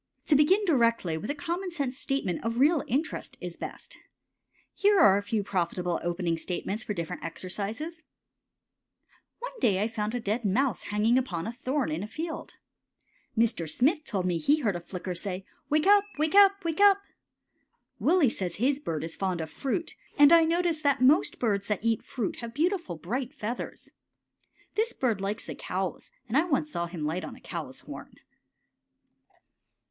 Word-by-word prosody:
To 300 - +4
begin 370 +9 +4
directly 230 - +2
with 160 +6 -5
a 290 - -1
common 350 +5 -3
sense 280 -7 -2
statement 265 - -2
of 230 +1 -2
real 295 +3 +4
interest 285 +6 -2
is - - -6
best. - - -8 0.7
Here 410 -1 +4
are 200 -8 +7
a - - -4
few 205 +1 -1
profitable 180 -2 -1
opening 170 -1 -1
statements 195 +5 -3
for 210 - -3
different 170 -2 -5
exercises: 210 - -5 1.4
One - - -6
day 195 - +3
I 210 - +1
found 220 0 -3
a - - 0
dead 225 +2 -1
mouse 245 +6 +1
hanging 215 +4 +3
upon 180 -11 -3
a 225 - -3
thorn 260 - -1
in 155 +3 -2
a 205 - -4
field. 320 +7 -6 0.8
Mr. 220 -8 +1
Smith 295 - +2
told 195 - -2
me 175 -2 0
he 295 - +3
heard 210 -7 +1
a - - -2
Flicker 180 +1 -5
say, 185 +1 -4 0.2
"Wake 305 +1 +2
up! 405 0 +6
Wake 310 +1 +1
up! 395 -1 +6
Wake 330 +3 -1
up!" 400 -1 +6 1.0
Willie 345 -4 +4
says 185 -6 -2
his 270 +6 +1
bird 160 - -3
is 165 0 -5
fond 185 -3 -1
of 160 -1 -5
fruit, 310 +5 -2 0.2
and 290 +2 +8
I 335 -1 +7
notice 335 -1 +1
that 280 -3 +2
most 285 +6 +4
birds 205 -4 0
that 210 +1 -2
eat 225 -2 +2
fruit 235 -7 -4
have 230 -1 -7
beautiful, 335 - 0
bright 245 - -4
feathers. 240 -1 -5 0.8
This 445 +2 0
bird 230 -7 0
likes 205 +3 -3
the - - -5
cows, 185 0 -4 0.2
and 230 - -3
I 310 +5 +4
once 300 -2 0
saw 170 -8 -2
him 165 -3 -5
light 165 +5 -2
on - - -7
a - - -15
cow's - - -6
horn. - - -10
235 Hz, 175 wpm, -28 LUFS, 190-305 Hz, 1.4 s, and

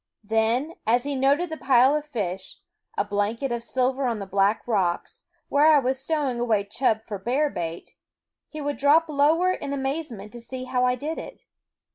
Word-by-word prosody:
Then, 225 +8 +1
as 240 +2 +3
he 285 0 -2
noted 280 +6 +2
the 315 - -4
pile 260 0 +4
of 300 0 -2
fish, 190 -8 -4 0.4
a - - +1
blanket 210 +6 -1
of 235 -1 -2
silver 260 +2 0
on 235 -2 -1
the 200 - -5
black 195 +4 +1
rocks, 190 -7 -1 0.2
where 290 +2 +4
I 310 -1 +7
was 260 -1 0
stowing 280 -5 -1
away 225 -4 +1
chub 220 +1 0
for 205 -3 -5
bear 270 +8 0
bait, 165 0 -5 0.6
he 310 - -7
would 290 0 -2
drop 305 +4 +4
lower 310 +5 +3
in 280 -6 -4
amaze 280 +3 -2
ment 210 -1 -9
to 240 - -9
see 255 +2 -6
how 250 0 0
I 250 0 +2
did 300 +6 -4
it. - - -10
255 Hz, 190 wpm, -25 LUFS, 220-285 Hz, 0.6 s, I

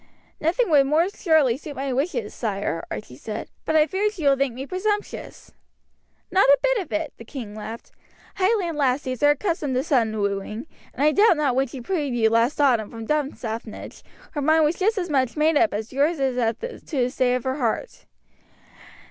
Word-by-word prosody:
"Nothing 350 +6 +1
would 280 -3 +5
more 320 +6 +3
surely 315 - +2
suit 295 0 -9
my 270 -1 -2
wishes, 260 - -2
sire," 200 -7 -2
Archie 115 +4 -7
said; 210 - -6 0.2
"but 315 - 0
I 305 -1 +6
fear 395 +5 0
she 395 -6 -8
will 280 -1 +5
think 270 -3 -1
me 265 +2 -5
presumptuous." 410 +5 -3 0.8
"Not 380 -6 +4
a 280 - +8
bit - - +3
of 360 -6 -6
it," 315 -1 -2
the - - -10
king 230 -3 -8
laughed. 220 +2 -8 0.5
"Highland 370 -5 +1
lassies 255 -2 0
are 290 - +6
accustomed 295 -3 0
to 255 - +1
sudden 230 -7 +1
wooing, 200 +3 -2 0.3
and 275 - -1
I 305 - +5
doubt 405 0 +5
not 300 - 0
that 250 - 0
when 270 +1 +2
she 255 +1 -8
freed 290 -3 -2
you 220 -2 +3
last 230 +6 +2
autumn 245 -7 +3
from 225 -1 -8
Dunstaffnage 240 -6 -4 0.3
her 295 - -3
mind 315 +2 +4
was 310 +3 0
just 430 +3 +2
as 355 -4 -2
much 260 -1 +1
made 310 +1 +3
up 320 +3 +4
as 215 +3 -5
yours 290 +4 +1
is 265 -2 0
as 230 -2 +1
to 465 - -7
the 250 -1 +1
state 250 -2 +1
of 250 - -3
her 260 +1 -2
heart. 255 - -3
275 Hz, 200 wpm, -24 LUFS, 240-320 Hz, 0.8 s, a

